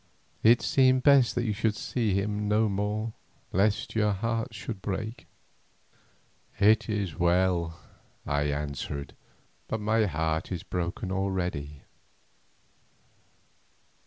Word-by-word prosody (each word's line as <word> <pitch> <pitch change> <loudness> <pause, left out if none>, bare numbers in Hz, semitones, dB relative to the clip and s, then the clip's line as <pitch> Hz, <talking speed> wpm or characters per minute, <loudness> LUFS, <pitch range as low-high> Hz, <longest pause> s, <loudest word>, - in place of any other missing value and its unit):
"It 115 +2 +5
seemed 130 -1 +4
best 140 -4 +5
that 120 - 0
you 110 - 0
should 110 +1 0
see 110 -3 -1
him 105 +1 -1
no 110 +1 +3
more, 105 +2 -2 0.4
lest 100 +3 +1
your 105 -2 +2
heart 115 +3 -2
should 105 -5 -6
break." 110 +5 -4 1.3
"It 105 +2 +4
is 100 -5 -2
well," 85 -1 +2 0.5
I 70 0 0
answered; 70 -1 -4 0.5
"but 110 - -2
my 110 +1 +2
heart 80 0 -1
is 90 -3 -3
broken 90 +1 -3
already." 90 -7 -2
100 Hz, 110 wpm, -28 LUFS, 85-110 Hz, 1.3 s, It